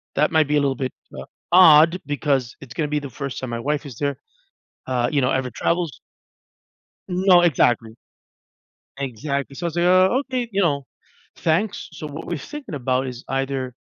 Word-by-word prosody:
That 150 Hz, +2 st, +2 dB
might 155 Hz, -2 st, +3 dB
be 150 Hz, -, +1 dB
a -, -, +3 dB
little 140 Hz, -1 st, +1 dB
bit, 130 Hz, 0 st, -3 dB, 0.3 s
uh, -, -, -7 dB, 0.3 s
odd 170 Hz, 0 st, +7 dB
because 140 Hz, -4 st, -1 dB
it's 125 Hz, -3 st, -11 dB
gonna 150 Hz, -2 st, -1 dB
be 150 Hz, 0 st, -1 dB
the 140 Hz, -2 st, -7 dB
1st 140 Hz, +1 st, -5 dB
time 130 Hz, -, -5 dB
my 115 Hz, 0 st, -3 dB
wife 150 Hz, +4 st, -2 dB
is 130 Hz, -6 st, -9 dB
there, 140 Hz, -1 st, -1 dB, 0.7 s
uh, 125 Hz, -2 st, 0 dB
you 145 Hz, -, +2 dB
know 125 Hz, -, +2 dB
ever 130 Hz, -1 st, -1 dB
travels 165 Hz, +5 st, -1 dB, 1.1 s
No, 180 Hz, -1 st, +4 dB
exactly. 120 Hz, -8 st, +2 dB, 1.0 s
Exactly. 140 Hz, +2 st, -3 dB
So 175 Hz, +5 st, -4 dB
I -, -, +1 dB
was 165 Hz, -, -8 dB
like, 175 Hz, -, +2 dB
"Oh, 185 Hz, +6 st, +5 dB
okay," 250 Hz, -3 st, -2 dB
you 200 Hz, 0 st, +1 dB
know, 140 Hz, -5 st, 0 dB, 0.5 s
"Thanks." 180 Hz, +6 st, -1 dB
So, 155 Hz, -, -7 dB
what 150 Hz, +2 st, -8 dB
we're 170 Hz, -3 st, -3 dB
thinking 290 Hz, -, -8 dB
about 130 Hz, 0 st, 0 dB
is 125 Hz, -1 st, -7 dB
either 135 Hz, -2 st, -2 dB
145 Hz, 185 wpm, -22 LUFS, 130-170 Hz, 1.1 s, odd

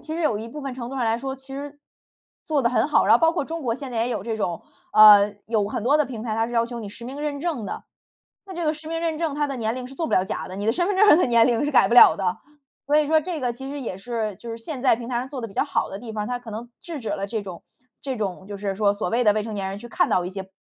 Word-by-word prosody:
其 315 Hz, -, -6 dB
实 335 Hz, -, -3 dB
有 230 Hz, -10 st, +1 dB
一 220 Hz, -, -6 dB
部 295 Hz, +5 st, -8 dB
分 275 Hz, -2 st, -5 dB
程 245 Hz, -2 st, -6 dB
度 270 Hz, -, -7 dB
上 255 Hz, -, -1 dB
来 225 Hz, +1 st, +1 dB
说， 265 Hz, +1 st, -4 dB
其 265 Hz, 0 st, -15 dB
实 285 Hz, +1 st, -7 dB, 0.6 s
做 295 Hz, -4 st, 0 dB
得 235 Hz, -, +2 dB
很 250 Hz, -, +2 dB
好。 300 Hz, -, +3 dB
然 -, -, +6 dB
后 -, -, -8 dB
包 325 Hz, 0 st, +4 dB
括 330 Hz, -, -1 dB
中 325 Hz, 0 st, -5 dB
国 230 Hz, -3 st, 0 dB
现 270 Hz, 0 st, -7 dB
在 235 Hz, -, -3 dB
也 235 Hz, +2 st, +1 dB
有 215 Hz, -6 st, -3 dB
这 225 Hz, 0 st, -3 dB
种， 175 Hz, -5 st, -3 dB, 0.3 s
呃， 210 Hz, -1 st, +8 dB
有 215 Hz, -3 st, +1 dB
很 210 Hz, +1 st, -4 dB
多 280 Hz, +5 st, +4 dB
的 300 Hz, -, +2 dB
平 240 Hz, -5 st, -7 dB
台， 220 Hz, -2 st, -2 dB
它 225 Hz, +1 st, +1 dB
是 240 Hz, -, -8 dB
要 230 Hz, -1 st, +2 dB
求 240 Hz, 0 st, -7 dB
你 215 Hz, -3 st, -6 dB
实 210 Hz, +3 st, -10 dB
名 270 Hz, +4 st, -7 dB
认 290 Hz, -2 st, -3 dB
证 300 Hz, -10 st, -2 dB
的。 -, -, -6 dB, 0.7 s
那 370 Hz, -, -7 dB
这 345 Hz, -, -3 dB
个 310 Hz, 0 st, +1 dB
实 310 Hz, +1 st, -10 dB
名 330 Hz, 0 st, -3 dB
认 325 Hz, -2 st, -1 dB
证， 320 Hz, -4 st, -2 dB
它 295 Hz, 0 st, +1 dB
的 275 Hz, -2 st, -4 dB
年 225 Hz, 0 st, -1 dB
龄 255 Hz, -1 st, -5 dB
是 270 Hz, -, -12 dB
做 320 Hz, +3 st, -3 dB
不 -, -, -3 dB
了 185 Hz, -, +4 dB
假 -, -, -5 dB
的， 185 Hz, -, -8 dB
你 205 Hz, -, -4 dB
的 225 Hz, -, +3 dB
身 350 Hz, +8 st, 0 dB
份 405 Hz, -, 0 dB
证 420 Hz, +3 st, +6 dB
儿 315 Hz, -, +7 dB
的 -, -, +3 dB
年 235 Hz, -2 st, +5 dB
龄 245 Hz, +3 st, +1 dB
是 295 Hz, -, -1 dB
改 -, -, +5 dB
不 235 Hz, -, +1 dB
了 245 Hz, -, +9 dB
的。 185 Hz, -2 st, -1 dB, 0.5 s
所 290 Hz, +1 st, +2 dB
以 305 Hz, -1 st, +4 dB
说 315 Hz, +1 st, +4 dB
这 320 Hz, -1 st, -5 dB
个 245 Hz, -1 st, 0 dB
其 265 Hz, +3 st, -8 dB
实 285 Hz, -1 st, -5 dB
也 190 Hz, -6 st, -5 dB
是， 215 Hz, -2 st, -4 dB
就 235 Hz, -, -9 dB
是 230 Hz, -, -5 dB
现 250 Hz, +3 st, -7 dB
在 260 Hz, -4 st, +4 dB
平 235 Hz, +1 st, -8 dB
台 240 Hz, -, -1 dB
上 250 Hz, -, -3 dB
做 265 Hz, -2 st, -6 dB
得 230 Hz, -, -5 dB
比 -, -, -14 dB
较 -, -, +1 dB
好 -, -, -1 dB
的 195 Hz, -, -7 dB
地 230 Hz, -2 st, -8 dB
方 210 Hz, -1 st, -2 dB
儿， -, -, -5 dB
它 245 Hz, 0 st, -3 dB
可 240 Hz, -2 st, -11 dB
能 230 Hz, +3 st, -7 dB
制 325 Hz, -5 st, -7 dB
止 225 Hz, -, -5 dB
了 195 Hz, 0 st, -2 dB
这 220 Hz, +1 st, -3 dB
种 185 Hz, -4 st, -9 dB, 0.4 s
这 270 Hz, -2 st, -3 dB
种 195 Hz, -3 st, -4 dB
就 205 Hz, -, -6 dB
是 200 Hz, -1 st, -3 dB
说 200 Hz, 0 st, +2 dB
所 200 Hz, -3 st, -3 dB
谓 245 Hz, +1 st, +1 dB
的 210 Hz, -, +6 dB
未 215 Hz, -1 st, -1 dB
成 220 Hz, -, -6 dB
年 195 Hz, -2 st, -3 dB
人 195 Hz, -, -6 dB
去 240 Hz, -, -10 dB
看 -, -, +2 dB
到 180 Hz, -, +1 dB
一 180 Hz, -, -4 dB
些 190 Hz, 0 st, -7 dB
240 Hz, 370 characters per minute, -24 LUFS, 215-285 Hz, 0.7 s, 了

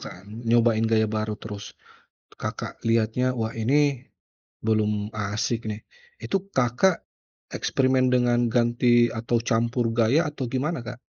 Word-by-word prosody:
kan. 90 Hz, -, -10 dB, 0.2 s
Nyobain 115 Hz, -1 st, +3 dB
gaya 110 Hz, -1 st, +2 dB
baru 110 Hz, 0 st, -2 dB
terus, 105 Hz, -1 st, -9 dB, 0.6 s
Kakak -, -, -5 dB
lihatnya, 115 Hz, +3 st, +1 dB
"Wah 110 Hz, -1 st, -2 dB
ini 135 Hz, +3 st, +1 dB, 0.6 s
belum 105 Hz, -1 st, 0 dB
asyik 110 Hz, +2 st, -2 dB
nih." 105 Hz, +1 st, -6 dB, 0.4 s
Itu 195 Hz, 0 st, -2 dB
Kakak 130 Hz, +9 st, +2 dB, 0.5 s
eksperimen 130 Hz, -1 st, +1 dB
dengan 120 Hz, -1 st, +3 dB
ganti 120 Hz, 0 st, +3 dB
atau 115 Hz, +1 st, 0 dB
campur 115 Hz, +1 st, 0 dB
gaya? 115 Hz, +7 st, +3 dB
Atau 140 Hz, -3 st, -5 dB
gimana, 135 Hz, +5 st, -2 dB
Kak? 125 Hz, +1 st, -7 dB
120 Hz, 125 wpm, -25 LUFS, 110-125 Hz, 0.6 s, Nyobain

